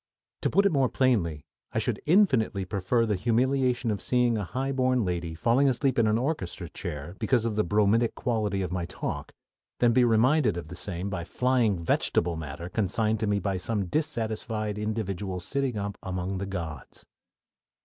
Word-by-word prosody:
To - - +1
put 200 - +3
it 200 - +4
more 135 -4 +2
plainly, 90 - +1 0.3
I - - -2
should - - -1
infinitely 130 - +3
prefer 100 +5 +1
the 110 - 0
humiliation 125 +3 +1
of 100 - -3
seeing 125 -2 +2
a 105 - -1
highborn 130 +3 0
lady 85 -2 -3
falling 120 - +3
asleep 130 0 +1
in 115 - +4
an 110 +1 +3
orchestra 125 - -3
chair 75 +5 -6
because 115 +1 +1
of 115 -2 -1
the 105 - +2
bromidic 105 +5 +2
quality 105 -5 -1
of 90 - -4
my 90 -2 -2
talk, - - -5 0.5
than 120 -1 +3
be 125 +1 +5
reminded 120 - +3
of 85 -2 -6
the 90 - -7
same 95 +1 -2
by 90 -3 -3
flying 125 -1 +1
vegetable 85 +1 +1
matter 80 +1 -6
consigned 110 +3 0
to 110 - -1
me 105 0 +2
by 100 -1 -1
some 100 +2 -1
dissatisfied 110 - -2
individual 100 -3 -3
sitting 130 +6 -2
up 100 0 -4
among 95 +1 -3
the 100 - -3
"gods." 85 -7 -7
110 Hz, 175 wpm, -27 LUFS, 95-125 Hz, 0.5 s, be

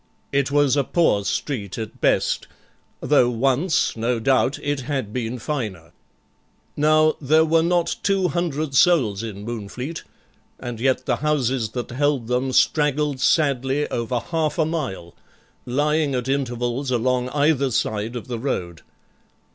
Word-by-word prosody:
It 140 -1 +1
was 145 -1 +3
a 140 - +2
poor 135 -11 +2
street 105 -6 -3
at 110 -2 -7
best, - - +1 0.5
though 140 -5 +3
once, 135 +8 +1
no 115 +1 -1
doubt, 130 +3 +2
it 145 -1 -1
had 130 -5 -3
been 125 0 -3
finer. 110 - -5 0.8
Now, 155 +1 +3
there 155 +3 +4
were 165 +1 +3
not 170 0 +1
two 195 -2 +1
hundred 155 -3 -2
souls 130 - +3
in 105 -3 -7
Moonfleet, 120 +7 -5 0.6
and 120 -2 -6
yet 130 +1 +1
the - - 0
houses 135 -6 0
that 125 -1 -4
held 140 -1 0
them 125 +3 -1
straggled 150 0 +2
sadly 135 0 +1
over 120 +1 -1
half 155 +1 -2
a 160 - +2
mile, 130 - -4 0.5
lying 145 +2 +1
at 125 0 -2
intervals 130 -1 -2
along 125 +1 0
either 145 -1 +2
side 110 0 -2
of 120 - -6
the 120 -2 -4
road. 90 - -3
135 Hz, 140 wpm, -22 LUFS, 120-150 Hz, 0.8 s, there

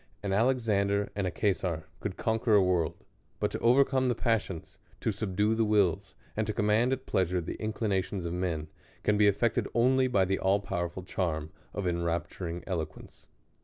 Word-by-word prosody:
An 100 -1 -1
Alexander 105 -3 +2
and 100 -2 -1
a - - -2
Cesar 90 -6 0
could 100 -3 -4
conquer 110 0 +2
a 100 - +6
world; 90 -4 +1 0.4
but - - 0
to - - -3
overcome 130 +2 +4
the 120 - +1
passions, 110 -8 -2 0.2
to 110 - 0
subdue 105 +1 0
the 115 0 +2
wills, 100 -3 +1 0.2
and 110 0 -1
to 110 - -1
command 110 +4 +2
at 130 0 -2
pleasure 90 -1 +1
the 80 - -4
inclinations 100 -4 -1
of 85 - -2
men, 85 -4 -2 0.4
can 105 - +3
be 105 0 +5
effected 110 +3 +2
only 130 +2 +4
by 100 -7 +3
the 95 +1 0
all 95 +1 +3
powerful 85 -2 -3
charm 80 -4 -2 0.2
of 100 - -4
enrapturing 85 0 -2
eloquence. 80 -5 -6
100 Hz, 170 wpm, -29 LUFS, 90-110 Hz, 0.4 s, a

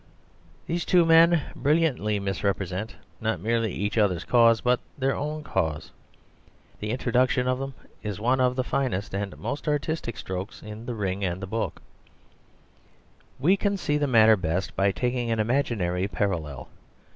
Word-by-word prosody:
These 170 +1 -2
two 175 -2 +4
men 165 -1 +6
brilliantly 140 -9 +1
misrepresent, 95 +1 -2 0.2
not 110 0 -1
merely 115 -1 0
each 105 +5 -1
other's 95 -5 +2
cause, 115 -2 +5
but 125 0 +2 0.2
their 135 0 +1
own 150 +1 -4
cause. 80 - -2 0.9
The 105 - -4
introduction 125 +1 +1
of 130 0 +1
them 135 0 -5 0.3
is 105 -3 -4
one 125 +4 +2
of 125 0 +2
the 130 - 0
finest 120 -8 -2
and 100 -1 -3
most 145 +3 -5
artistic 150 - -1
strokes 95 +1 -6
in 105 +2 -9
The 120 - -3
Ring 100 -2 -2
and 90 -1 -1
the 95 - -5
Book. 110 +4 -3 1.6
We 170 +9 +4
can 200 0 0
see 150 -5 0
the 145 - +1
matter 110 -3 +6
best 90 0 -2
by 100 0 +3
taking 125 +2 -1
an 115 -1 0
imaginary 105 -7 0
parallel. 85 -9 -3
115 Hz, 155 wpm, -26 LUFS, 100-135 Hz, 1.6 s, men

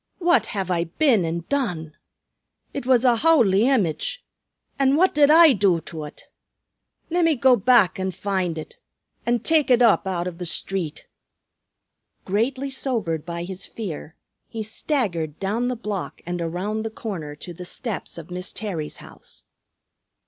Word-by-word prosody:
"What 350 -1 +3
have 195 -4 -3
I 170 -1 +1
been 225 - +2
an' 165 +1 -3
done? 180 - -2 0.8
It 280 -3 -5
was 255 -1 +4
a 240 -2 +5
howly 230 -8 +4
image; 270 - 0 0.5
an' 270 0 +4
what 370 +5 +3
did 290 -1 +5
I 320 -1 +8
do 195 -5 +2
to 160 0 -8
ut? 150 -1 -9 0.9
Lemme 330 -2 +3
go 260 0 +5
back 215 -4 +4
an' 190 0 -1
find 185 -3 -2
ut, 155 - -8 0.5
an' 240 -1 +2
take 315 +1 +2
ut 245 -1 +5
up 220 -4 +4
out 180 -2 -2
av 175 -1 -7
the 180 - -4
street." 175 -2 -2 1.2
Greatly 260 +7 -1
sobered 210 - -2
by 170 0 -4
his 185 +1 -7
fear, 175 -6 -7 0.3
he 225 -1 -5
staggered 205 - -2
down 215 +5 -1
the 250 - -1
block 210 -5 -5
and 175 0 -3
around 185 +6 -2
the 225 - -3
corner 180 -10 -6
to 175 +4 -9
the 180 - -9
steps 210 +2 -5
of 165 +1 -10
Miss 180 +1 -5
Terry's 175 -9 -4
house. - - -15
205 Hz, 155 wpm, -23 LUFS, 175-255 Hz, 1.2 s, I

